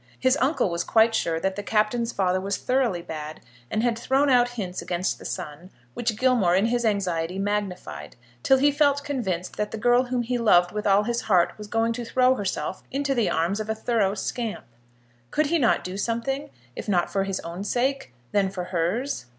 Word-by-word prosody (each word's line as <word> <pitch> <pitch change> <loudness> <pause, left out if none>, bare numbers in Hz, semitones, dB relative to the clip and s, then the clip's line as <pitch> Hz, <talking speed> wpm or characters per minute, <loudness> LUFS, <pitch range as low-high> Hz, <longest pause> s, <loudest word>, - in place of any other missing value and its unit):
His 260 +1 +3
uncle 265 - +1
was 170 0 -1
quite 225 0 +4
sure 165 -7 0
that 190 +2 -1
the 205 - -4
Captain's 220 +3 0
father 185 -2 0
was 200 +1 -2
thoroughly 250 -9 0
bad, 155 -1 -7 0.3
and 215 - -1
had 240 -2 +2
thrown 270 +3 +2
out 245 -1 +4
hints 185 -4 -4
against 180 +1 -2
the - - -12
son, 170 0 -6 0.2
which 225 - -2
Gilmore 235 -8 +3
in 195 +3 +3
his 240 +1 0
anxiety 185 -5 0
magnified 190 - -3 0.3
till 265 - +4
he 285 +2 +4
felt 285 -1 +2
convinced 200 -12 -3
that 210 0 -1
the 225 - -5
girl 245 +3 +3
whom 245 -1 -1
he 245 +1 -1
loved 180 -6 +4
with 210 0 -3
all 200 +1 +4
his 235 +2 -1
heart 180 -5 +2
was 210 -1 -9
going 225 +1 +1
to 240 +1 -5
throw 255 +2 +3
herself 200 -4 -3
into 275 +1 -1
the 235 -5 +1
arms 170 +6 0
of 215 0 -4
a 220 - 0
thorough 220 -3 0
scamp. 230 +1 -4 0.6
Could 305 - +1
he 335 +3 +1
not 240 - +2
do 185 +1 -5
something, 235 +6 -2 0.3
if - - -6
not 180 -3 +1
for 195 - +1
his 195 -1 -2
own 170 +3 -6
sake, 255 - -1 0.2
then 200 -2 +2
for 185 -2 -5
hers? 180 - -2
210 Hz, 205 wpm, -25 LUFS, 185-245 Hz, 0.6 s, quite